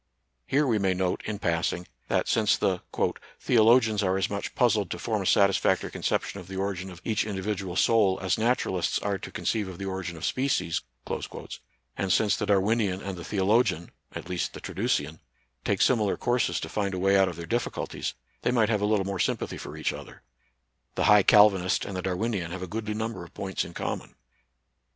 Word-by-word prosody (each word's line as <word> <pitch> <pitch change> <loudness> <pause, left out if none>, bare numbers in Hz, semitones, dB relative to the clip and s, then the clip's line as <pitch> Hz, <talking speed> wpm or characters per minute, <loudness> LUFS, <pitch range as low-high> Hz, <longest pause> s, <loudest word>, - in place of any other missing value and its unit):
Here 145 +2 +2
we 115 -5 +2
may 95 -1 +1
note, 90 -1 -1
in 105 -1 -3
passing, 85 -1 -1 0.2
that - - +1
since 110 -2 +3
the 90 -2 0 0.3
" - - -19
theologians 110 -2 +4
are 95 -1 +1
as 95 +2 -1
much 100 0 -4
puzzled 110 -6 +2
to - - -4
form 110 -3 -1
a 95 - -2
satisfactory 100 -1 +3
conception 100 - -2
of 90 - -11
the 95 - -7
origin 95 -1 -3
of 90 -1 -12
each 110 - +1
individual 95 -3 -3
soul 100 -4 +3
as 95 -1 +1
naturalists 110 -6 0
are 100 -1 -2
to - - -8
con - - -7
ceive 105 -3 +1
of 95 -2 -8
the 100 - -5
origin 95 -3 -4
of - - -4
species," 125 -11 0 1.1
and 95 -1 -1
since 105 +1 +3
the 105 - -3
Darwinian 100 -1 +2
and 100 -1 -5
the 85 - -8
theologian 100 -3 +1 0.2
(at - - -7
least 90 -1 -2
the - - -8
Tra - - -7
ducian) 75 +2 -1 0.4
take - - +2
similar 110 -6 +2
courses 120 -1 +1
to - - -4
find 100 -2 -2
a - - -3
way 95 +1 +3
out 95 -1 +4
of 90 - -7
their 85 0 -7
difficulties, 120 +8 -3 0.3
they - - +1
might 115 -4 +3
have 105 -3 +1
a 105 - +2
little 105 -2 +2
more 100 -1 -3
sympathy - - -1
for - - -8
each - - -1
other. - - -11 0.7
The - - 0
high 105 -1 +7
Cal 105 +1 +7
vinist 95 -1 -1
and 100 - -6
the 90 - -2
Darwinian 95 -1 -2
have 95 +1 -5
a - - -5
goodly 105 +2 -4
number 110 -4 -3
of 85 - -14
points 95 -1 -2
in - - -10
common. - - -4
100 Hz, 205 wpm, -27 LUFS, 95-110 Hz, 1.1 s, high